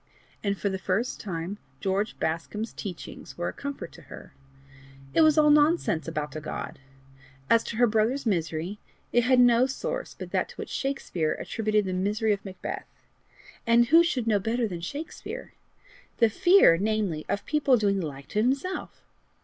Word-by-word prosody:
And 200 -1 0
for 200 - -2
the 190 -1 -2
first 200 +7 -1
time, 185 +1 -5 0.2
George 195 +2 -1
Bascombe's 190 +7 -3
teachings 185 -5 -8
were 175 - -1
a - - -7
comfort 280 0 -6
to - - -14
her. - - -12 0.8
It - - +4
was 310 -1 +5
all 300 -1 +6
nonsense 295 - +3
about 150 -3 -4
a 155 - -4
God. 155 - -6 0.7
As 230 0 +5
to - - -5
her 245 +2 +5
brother's 230 +5 +1
misery, 175 0 -1 0.3
it 240 -1 +4
had 255 0 +4
no 245 +1 +5
source - - -4
but - - -8
that - - 0
to - - -12
which - - -7
Shakespeare 225 - -1
attributed 215 -2 -1
the 185 - -2
misery 210 +4 +1
of 200 - -5
Macbeth 190 -2 -6 0.8
and 235 0 +5
who 330 +3 +8
should 310 -9 0
know 215 -3 +3
better 230 +3 0
than 175 -4 -6
Shakespeare? 285 - -7 0.6
the 230 -3 +4
fear, 350 - +6
namely, 205 -6 0
of 200 - -2
people 285 -4 +3
doing 200 -2 +1
the 170 - -2
like 140 -1 -9
to 210 - +1
himself! 275 +10 -2
215 Hz, 175 wpm, -27 LUFS, 185-260 Hz, 0.8 s, who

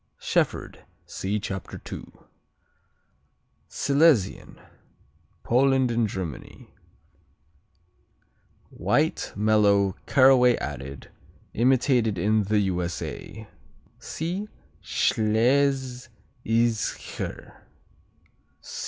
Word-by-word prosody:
Shefford - - -1 0.2
see 100 +3 -3
Chapter 95 -2 -6
2. - - -9 1.6
Silesian 140 - +1 0.8
Poland 130 0 +2
and 115 -1 +1
Germany 90 -8 -7 2.0
White; - - 0
mellow; 100 -2 +3
caraway 130 -2 +5
seeded. 70 +1 -7 0.4
Imitated 120 -3 +2
in 105 +3 +1
the 105 +1 +2
U.S.A. 90 +3 -4 0.5
(see 180 +6 -4 0.3
Schlesischer.) 120 -1 -1
115 Hz, 55 wpm, -25 LUFS, 100-130 Hz, 2.0 s, caraway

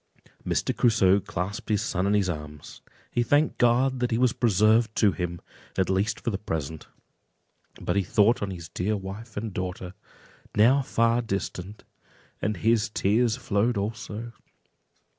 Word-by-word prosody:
Mr. - - -1
Crusoe 100 -5 +4
clasped 100 +3 -5
his 105 0 +1
son 95 -3 -1
in 105 - +2
his 100 -2 +2
arms; 75 -3 -7 0.3
he 120 - +1
thanked 145 +6 +2
God 125 +2 +3
that 125 0 0
he 115 - 0
was 125 -1 +3
preserved 110 -1 +3
to 105 -3 +4
him, 85 -2 -4 0.4
at 95 0 +1
least 100 +3 0
for 120 - -1
the 95 - -3
present; 80 -5 -4 0.9
but - - -2
he 100 - +3
thought 105 +5 +3
on 100 - -2
his 85 -4 -7
dear 100 +7 -1
wife 100 +4 -8
and 105 -1 -4
daughter, 90 0 -5 0.6
now 125 +7 +5
far 115 -2 +1
distant, 100 -2 -5 0.6
and 105 -1 -1
his 110 +3 +2
tears 110 +3 +2
flowed 115 -1 0
also. 110 +2 -4
105 Hz, 155 wpm, -26 LUFS, 95-115 Hz, 0.9 s, now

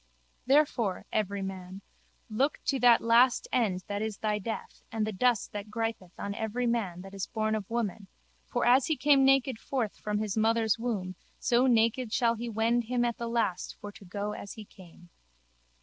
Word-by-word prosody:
Therefore, 260 -9 +2
everyman, 195 -2 -3 0.4
look 260 +7 0
to 270 - +1
that 240 -1 +6
last 235 +2 +4
end 200 -7 +1
that 205 0 -3
is 220 -2 -3
thy 210 -1 -1
death 220 +3 -6
and 220 -1 -1
the 215 - -2
dust 235 +3 +1
that 205 0 -6
gripeth 225 -4 -3
on 200 - -4
every 220 +3 -2
man 210 -7 -1
that 195 +1 -11
is 195 -1 -4
born 220 -1 -1
of 210 -3 -3
woman 215 -4 -2 0.4
for - - -1
as 250 +2 +5
he 315 - +1
came 285 -2 +4
naked 270 -3 +3
forth 245 -7 -2
from 210 0 -2
his 210 -2 -2
mother's 225 0 +2
womb 205 -6 -2 0.2
so 250 0 +2
naked 230 0 +2
shall 235 0 +2
he 235 +1 -5
wend 230 +2 +1
him 240 +1 0
at 235 -1 -2
the 235 - -3
last 225 -6 -1
for 205 - -7
to 205 - -15
go 200 +3 -4
as 200 -1 -7
he 215 - -10
came. 175 -2 -16
220 Hz, 185 wpm, -29 LUFS, 200-240 Hz, 0.4 s, that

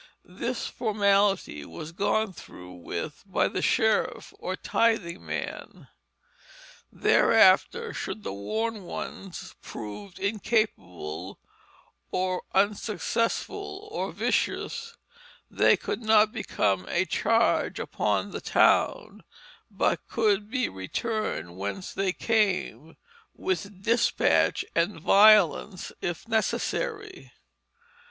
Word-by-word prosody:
This - - -4
formality 200 - +1
was 85 - -8
gone 205 +3 0
through 90 - -12
with 90 - -6
by 190 - +1
the - - -3
sheriff 220 -2 +1
or - - -3
tithing 205 -7 0
man. - - -6 1.0
Thereafter 465 -1 +4
should 215 - -5
the - - -4
warned 215 - -3
ones 190 -3 -7
prove 120 - -8
incapable 195 - -2 0.7
or 185 0 -1
unsuccessful 210 - -1
or 455 - -3
vicious, 465 0 -2 0.5
they - - +4
could - - -4
not 215 -1 +4
become 100 - -1
a 180 +2 +1
charge 225 +6 +1
upon - - -1
the - - -5
town, - - +2 0.5
but - - 0
could 210 -2 +1
be 255 +1 0
returned 95 - -3
whence 100 - -5
they 195 -1 0
came 185 -7 0 0.4
with 200 - -3
despatch 235 +2 +2
and 170 +2 0
violence 200 -1 +5
if 175 +5 -4
necessary. 415 - -2
200 Hz, 95 wpm, -27 LUFS, 170-225 Hz, 1.0 s, violence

